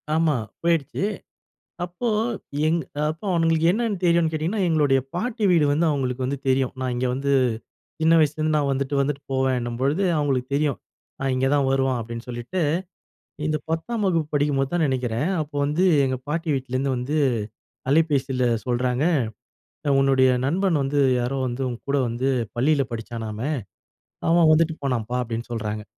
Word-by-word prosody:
ஆமா 160 -2 +2 0.3
போயிடுச்சு. 165 -4 0 0.8
அப்போ 180 +7 -4 0.6
எங் 165 +2 +2 0.3
அப்போ 160 +5 -6
அவங்களுக்கு 165 -1 +2
என்னன்னு 220 -2 -1
தெரியும்னு 170 -2 +3
கேட்டிங்கன்னா? 165 +7 -1
எங்களுடைய 145 -5 +3
பாட்டி 220 +4 -2
வீடு 165 -4 +4
வந்து 160 +4 +2
அவங்களுக்கு 130 -3 -1
வந்து 140 +2 -2
தெரியும். 130 -1 +2
நான் 130 -1 -1
இங்கே 125 +1 0
வந்து 140 +2 -1 0.7
சின்ன 160 +1 +5
வயசுலருந்து 155 0 +2
நான் 145 -2 +1
வந்துட்டு 135 +1 -2
வந்துட்டு 140 0 -1
போவேன்னும்பொழுது, 130 +4 0 0.2
அவங்களுக்கு 135 -4 0
தெரியும். 145 -1 +1 0.4
ஆ - - -2
இங்கே 130 +1 +1
தான் 140 -2 +2
வருவான் 135 -1 +1
அப்படின்னு 115 +1 -7
சொல்லிட்டு, 120 +10 -4 0.9
இந்த 155 0 +1
10ஆம் 210 +7 -2
வகுப்பு 165 -5 +1
படிக்கும்போது 145 -2 +1
தான் 170 -2 +2
நினைக்கிறேன். 130 +1 -1
அப்போ 145 -1 -9
வந்து 150 +6 +1 0.2
எங்க 130 -1 0
பாட்டி 165 +2 -2
வீட்லேருந்து 130 0 -1
வந்து 125 +5 -2 0.7
அலைபேசியில 140 -4 +2 0.2
சொல்றாங்க. 125 +2 0 1.0
"உன்னுடைய 135 -1 +4 0.2
நண்பன் 175 +2 +1
வந்து 140 +2 0 0.2
யாரோ 125 +3 -1
வந்து 120 +2 -4
உன் 120 - -5
கூட 140 - +2
வந்து 120 +3 -2 0.3
பள்ளில 140 +3 +3
படிச்சானாமே, 115 +2 -4 0.8
அவன் 165 -1 +5
வந்துட்டு 160 0 +2
போனான்ப்பா." 125 -3 -1
அப்படின்னு 115 0 -5
சொல்றாங்க. 105 -2 -3
140 Hz, 145 wpm, -24 LUFS, 130-160 Hz, 1.0 s, சின்ன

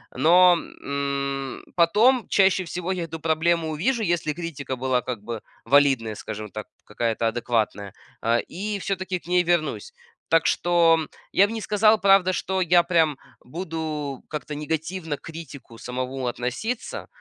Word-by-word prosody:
но, 175 +2 +6
м, 140 -2 -4
потом 215 +9 +4
чаще 190 -1 +3
всего 180 +2 -4
я 180 -2 -2
эту 165 0 -7
проблему 165 +1 +1
увижу, 225 - 0
если 170 -4 0
критика 145 -5 -5
была, 130 0 0
как 120 -5 -5
бы, 115 0 -5 0.2
валидная, 135 -6 +3
скажем 105 0 -7
так, 105 0 -7 0.2
какая-то 115 +1 -2
адекватная, 110 -4 -1 0.3
а, 115 +1 +2
и 205 - -4
всё-таки 190 -1 -2
к - - -19
ней 180 0 +3
вернусь. 175 - -1 0.3
Так 165 0 +3
что 165 -3 +3 0.2
я 200 - +5
бы 225 - -6
не 225 - -4
сказал, 215 +1 +3
правда, 195 -2 +5
что 190 +1 -2
я 175 -1 +4
прям 165 -4 +2 0.2
буду 155 -3 -5
как-то 150 0 -5
негативно 160 +2 -3
к - - -30
критику 145 -7 -10
самому 130 +2 -4
относиться, 125 - -4
160 Hz, 145 wpm, -24 LUFS, 130-180 Hz, 0.3 s, но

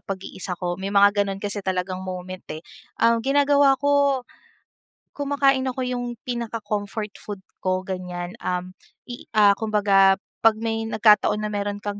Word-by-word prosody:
pag-iisa 190 -2 -6
ko 175 -1 -2
may 195 - -3
mga 205 0 +5
gano'n 195 -1 -3
kasi 205 0 -4
talagang 185 -1 -2
moment, 185 0 -6
eh. 155 +1 -7 0.3
Um, 230 0 +3
ginagawa 280 +1 +4
ko, 280 -2 +2 0.9
kumakain 280 -2 +1
ako 255 0 -3
yung 245 -1 -3
pinaka 235 -2 -3
comfort 210 0 -3
food 205 -2 -7 0.2
ko 185 0 -1
ganyan. 180 -1 -5
Um, 180 0 -3 0.3
i 245 -1 -10 0.3
kumbaga 200 -3 +4 0.2
pag 225 -1 +5
may 225 0 -2
nagkataon 210 -1 +4
na 210 - -2
mayro'n 205 0 -2
kang 205 0 -4
205 Hz, 145 wpm, -23 LUFS, 190-240 Hz, 0.9 s, mga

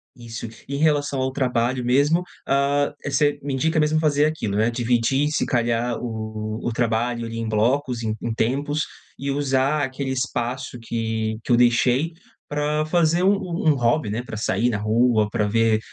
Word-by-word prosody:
isso, 115 -1 -7 0.2
em 140 +1 -3
relação 145 -2 +1
ao 130 0 0
trabalho 125 -2 0
mesmo, 145 +8 +3 0.2
hã, 140 +1 +2
você 145 +1 +1
me 140 -1 -3
indica 160 +5 +1
mesmo 155 +1 +2
fazer 150 -2 +3
aquilo, 155 -10 -2
né. 110 +2 +3
Dividir, 120 +4 +1
se - - 0
calhar, 120 0 0
o 110 -2 -5 0.2
o 120 - -1
trabalho 120 0 0
ali 115 0 -6
em 115 0 -3
blocos, 120 +3 0
em 110 -1 -1
em 120 - -2
tempos, 145 +6 0 0.3
e 140 - -4
usar 140 +1 +1
aquele 135 0 -3
espaço 125 -1 -3
que 110 -1 -2
que - - -3
eu - - +7
deixei 125 +6 +3 0.4
pra 150 +1 0
fazer 170 +1 +2
um 195 +2 +5 0.3
um 150 - +4
hobby, 120 0 +1
né. 110 +4 -3
Pra 120 -3 -7
sair 115 +2 +1
na 110 - -1
rua, 110 0 +2
pra 105 0 0
ver 115 0 +2
125 Hz, 175 wpm, -23 LUFS, 115-145 Hz, 0.4 s, eu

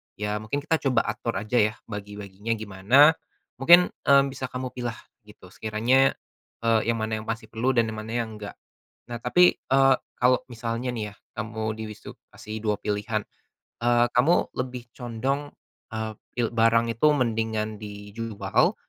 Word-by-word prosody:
ya 105 0 -2
mungkin 110 +7 -3
kita 160 +1 +1
coba 130 -4 +2
atur 115 - -3
aja 110 +3 0
ya 110 +1 +2 0.2
bagi-baginya 105 +1 -5
gimana. 110 +8 +5 0.5
Mungkin, 175 +6 +7 0.2
mmm, 140 -1 +5
bisa 130 -1 -5
kamu 125 0 -5
pilah 120 -2 -4 0.3
gitu 105 -3 -15
sekiranya, 115 +5 +2 0.5
eee, 115 -1 +4
yang 115 - -2
mana 110 0 -1
yang 110 - -13
masih 115 0 -3
perlu 115 +3 -1
dan 115 -1 +4
yang 110 - -6
mana 110 +1 -8
yang 120 -1 -1
enggak. 105 -1 -8 0.5
Nah, 120 - -4
tapi, 180 +9 +4
eee, 135 0 +4 0.2
kalau 125 +1 +4
misalnya 115 +1 -3
nih 110 -3 -3
ya, - - -22 0.2
kamu 110 0 -3
dilis 110 -1 -7
itu - - -8 0.2
kasih 110 +1 -7
2 105 -1 +1
pilihan. 105 +1 -1 0.6
Eee, 120 0 +4
kamu 140 +8 +3
lebih 125 -1 -4
condong, 135 +4 -3 0.4
eee, 110 0 -3 0.2
pil 120 -1 +1
barang 115 0 +4
itu 115 +7 +3
mendingan 110 -4 -1
dijual 105 +1 -1
115 Hz, 160 wpm, -26 LUFS, 110-125 Hz, 0.6 s, Mungkin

